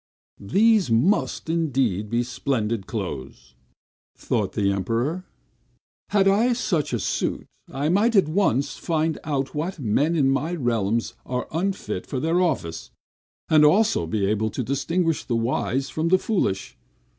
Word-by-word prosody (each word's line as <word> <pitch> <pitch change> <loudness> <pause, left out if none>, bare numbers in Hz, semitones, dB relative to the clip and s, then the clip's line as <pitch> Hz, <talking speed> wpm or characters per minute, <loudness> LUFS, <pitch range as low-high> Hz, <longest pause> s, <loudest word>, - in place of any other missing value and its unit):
"These 205 - +3
must, 125 - +1
indeed, 135 - 0
be 120 +2 +1
splendid 115 -4 -2
clothes!" 65 -1 -6 0.6
thought - - -1
the 100 -1 +1
Emperor. 115 - -1 0.8
"Had 195 -2 +3
I 220 +6 +3
such 190 - -1
a 120 - 0
suit, - - -2 0.3
I 140 +2 -2
might 215 +6 +3
at 195 -6 +5
once 155 - +1
find 160 -1 -1
out 135 -3 -2
what 165 +6 -3
men 145 +6 +1
in 135 -4 +3
my 150 +6 -1
realms 115 - 0
are 125 0 -3
unfit 190 +4 -3
for 135 - -3
their 165 +6 +1
office, 135 - -2 0.6
and 155 -1 +5
also 155 - +3
be 100 +3 0
able 110 +2 0
to 115 +5 -3
distinguish 165 +6 0
the 120 - -2
wise 125 +3 -1
from 155 +1 -1
the 185 +2 +5
foolish! 185 - -1
140 Hz, 145 wpm, -24 LUFS, 115-175 Hz, 0.8 s, at